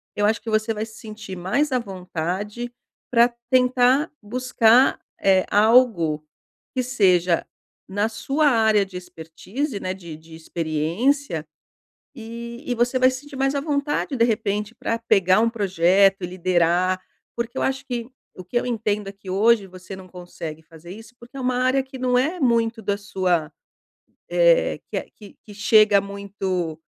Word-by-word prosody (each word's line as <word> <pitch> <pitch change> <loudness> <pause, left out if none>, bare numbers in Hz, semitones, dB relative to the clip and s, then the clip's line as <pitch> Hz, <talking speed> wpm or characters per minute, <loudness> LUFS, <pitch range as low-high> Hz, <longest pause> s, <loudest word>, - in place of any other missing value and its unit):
eu 205 - +1
acho 220 0 +1
que 225 - -6
você 215 +1 +1
vai 215 +1 -3
se 220 -1 -14
sentir 215 -3 -8
mais 240 +12 0
à 255 - +2
vontade 195 +3 -5 0.4
pra 240 0 +4 0.2
tentar 255 +3 +3
buscar, 245 +2 +3 0.2
eh, 190 -1 +4
algo 205 -9 +3 0.5
que 255 - +1
seja 185 -8 +2 0.4
na 205 +3 0
sua 285 +6 0
área 220 -5 +3
de 190 - -15
expertise, 180 - -6
né, 185 - -3
de 170 -4 -9
de 160 +1 -14
experiência, 165 - -1 0.7
e 235 +1 -8
e 245 - 0
você 245 +2 +1
vai 255 0 +6
se 255 +1 -5
sentir 290 -1 -12
mais 270 +1 +1
à 280 - 0
vontade, 290 -1 -1
de 230 - +3
repente, 210 -1 -1
pra 230 - -2
pegar 190 -4 +3
um 230 +1 +3
projeto, 195 -2 +3
liderar 180 0 +1 0.3
porque 235 +2 -4
eu - - -1
acho 265 0 -1
que 240 -1 -4 0.3
o - - -6
que 185 - -12
eu - - -5
entendo 210 -3 -1
é - - -6
que 195 -1 -13
hoje 215 +2 +3
você 185 +1 -10
não 190 -1 -12
consegue 175 -3 -8
fazer 165 +1 -13
isso 225 +4 -12
porque 240 +3 -16
é - - -5
uma 250 0 0
área 255 +2 +2
que 265 0 -11
não 250 -1 +1
é 315 +8 0
muito 230 -4 +1
da 200 - 0
sua, 185 -6 -1 0.8
eh, - - +3
que - - -3
eh, - - -4
que 205 -2 -15
que 210 - -12
chega 210 0 +5
muito, 195 -4 -4
215 Hz, 165 wpm, -23 LUFS, 185-245 Hz, 0.8 s, vai